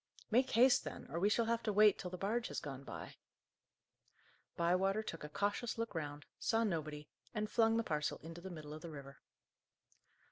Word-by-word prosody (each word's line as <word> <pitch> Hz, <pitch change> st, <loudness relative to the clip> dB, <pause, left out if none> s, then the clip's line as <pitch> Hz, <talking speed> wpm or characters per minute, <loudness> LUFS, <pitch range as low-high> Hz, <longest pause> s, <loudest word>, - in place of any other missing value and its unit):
"Make 255 Hz, +4 st, +4 dB
haste, 250 Hz, +2 st, +5 dB
then, -, -, -6 dB
or 165 Hz, -, -1 dB
we 200 Hz, +4 st, +4 dB
shall 230 Hz, +2 st, +3 dB
have 230 Hz, 0 st, +1 dB
to 215 Hz, -, 0 dB
wait 210 Hz, 0 st, +6 dB
till 180 Hz, -, -4 dB
the 180 Hz, -, -6 dB
barge 220 Hz, +5 st, 0 dB
has -, -, -3 dB
gone 140 Hz, -3 st, -6 dB
by." -, -, -8 dB, 1.4 s
Bywater 190 Hz, +5 st, +2 dB
took 165 Hz, -7 st, -6 dB
a 150 Hz, -, -5 dB
cautious 205 Hz, +8 st, -1 dB
look 230 Hz, -1 st, -2 dB
round, 145 Hz, -3 st, -4 dB
saw 225 Hz, 0 st, +2 dB
nobody, 155 Hz, -7 st, -2 dB, 0.3 s
and 215 Hz, 0 st, 0 dB
flung 225 Hz, -1 st, +4 dB
the 230 Hz, -, +2 dB
parcel 150 Hz, -6 st, -1 dB
into 165 Hz, +1 st, -8 dB
the 190 Hz, -, -7 dB
middle 155 Hz, -4 st, -7 dB
of 155 Hz, -, -8 dB
the 170 Hz, -, -7 dB
river. 140 Hz, -2 st, -9 dB
185 Hz, 190 wpm, -37 LUFS, 155-225 Hz, 1.4 s, wait